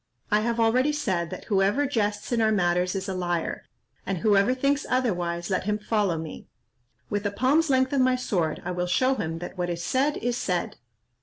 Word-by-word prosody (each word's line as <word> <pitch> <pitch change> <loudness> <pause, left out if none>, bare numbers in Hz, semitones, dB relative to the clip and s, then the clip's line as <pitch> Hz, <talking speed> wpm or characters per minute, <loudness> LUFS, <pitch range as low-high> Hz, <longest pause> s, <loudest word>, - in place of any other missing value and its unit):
I 210 - +4
have 235 +2 -1
already 250 +6 +3
said, 185 - -1
that - - -7
whoever 205 +7 +2
jests 210 -6 -1
in 235 -1 +2
our 220 0 +3
matters 180 -2 +1
is 195 +1 -3
a 190 - -2
liar: 175 -2 -2 0.4
and 195 -1 -2
whoever 205 +6 +3
thinks 280 +2 +1
otherwise, 175 -8 -1
let 185 0 0
him 210 0 0
follow 210 -5 0
me; 160 -1 -7 0.6
with 205 -1 -1
a - - -2
palm's 280 +9 +2
length 260 0 +2
of 275 - +3
my 255 0 +3
sword 175 -10 -1
I - - -2
will 180 0 -2
show 255 +9 +2
him 165 -10 -3
that 175 +2 -8
what 175 0 -1
is 170 -1 -3
said 270 - +1
is 245 +1 -1
said." 180 -6 -2
205 Hz, 205 wpm, -26 LUFS, 180-255 Hz, 0.6 s, I